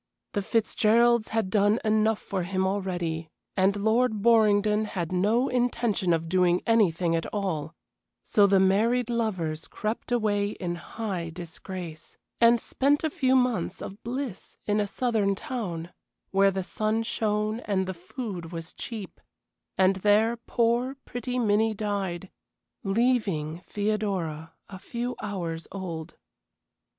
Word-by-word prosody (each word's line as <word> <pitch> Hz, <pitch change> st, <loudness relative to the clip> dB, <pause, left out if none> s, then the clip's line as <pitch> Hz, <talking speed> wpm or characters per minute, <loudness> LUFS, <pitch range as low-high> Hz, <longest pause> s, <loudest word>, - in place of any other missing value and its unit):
The 205 Hz, -, 0 dB
Fitzgeralds 225 Hz, +2 st, +3 dB
had 220 Hz, -4 st, -1 dB
done 205 Hz, +1 st, +4 dB
enough 215 Hz, 0 st, +3 dB
for 195 Hz, -2 st, -3 dB
him 185 Hz, +1 st, -1 dB
already, 175 Hz, -5 st, -2 dB, 0.3 s
and 195 Hz, +1 st, +3 dB
Lord 220 Hz, +1 st, +1 dB
Borringdon 215 Hz, -2 st, +4 dB
had 175 Hz, -5 st, -4 dB
no 210 Hz, +8 st, +2 dB
intention 240 Hz, -6 st, +1 dB
of 165 Hz, 0 st, +1 dB
doing 180 Hz, 0 st, +2 dB
anything 180 Hz, -7 st, +3 dB
at 165 Hz, -, -1 dB
all, 170 Hz, -6 st, -3 dB, 0.5 s
so 205 Hz, -1 st, +4 dB
the 195 Hz, -1 st, +4 dB
married 225 Hz, +6 st, +3 dB
lovers 185 Hz, -10 st, -2 dB
crept 215 Hz, +3 st, -4 dB
away 205 Hz, -3 st, +1 dB
in 175 Hz, -3 st, -3 dB
high 180 Hz, -1 st, -4 dB
disgrace, 170 Hz, -1 st, -8 dB, 0.2 s
and 235 Hz, 0 st, +6 dB
spent 285 Hz, +6 st, +1 dB
a 315 Hz, -, 0 dB
few 265 Hz, -6 st, +2 dB
months 250 Hz, -9 st, +1 dB
of 200 Hz, -, -8 dB
bliss 245 Hz, -3 st, -5 dB
in 210 Hz, 0 st, +1 dB
a 205 Hz, -, +1 dB
southern 215 Hz, -3 st, +1 dB
town, 180 Hz, -8 st, -4 dB, 0.4 s
where 195 Hz, 0 st, +5 dB
the 190 Hz, -1 st, -2 dB
sun 215 Hz, +4 st, -1 dB
shone 215 Hz, 0 st, -1 dB
and 195 Hz, -5 st, -1 dB
the 190 Hz, -, -3 dB
food 180 Hz, -, -6 dB
was 165 Hz, 0 st, -7 dB
cheap, 215 Hz, -6 st, -7 dB, 0.6 s
and 190 Hz, 0 st, +4 dB
there 210 Hz, +4 st, +3 dB
poor, 235 Hz, +2 st, 0 dB
pretty 245 Hz, +1 st, -4 dB
Minnie 220 Hz, -1 st, +2 dB
died, 195 Hz, -3 st, -3 dB, 0.5 s
leaving 195 Hz, -8 st, +1 dB
Theodora 195 Hz, -7 st, -2 dB
a 190 Hz, -, -9 dB
few 240 Hz, +5 st, -4 dB
hours 170 Hz, -5 st, -4 dB
old. 170 Hz, -5 st, -6 dB
205 Hz, 135 wpm, -27 LUFS, 180-225 Hz, 0.6 s, and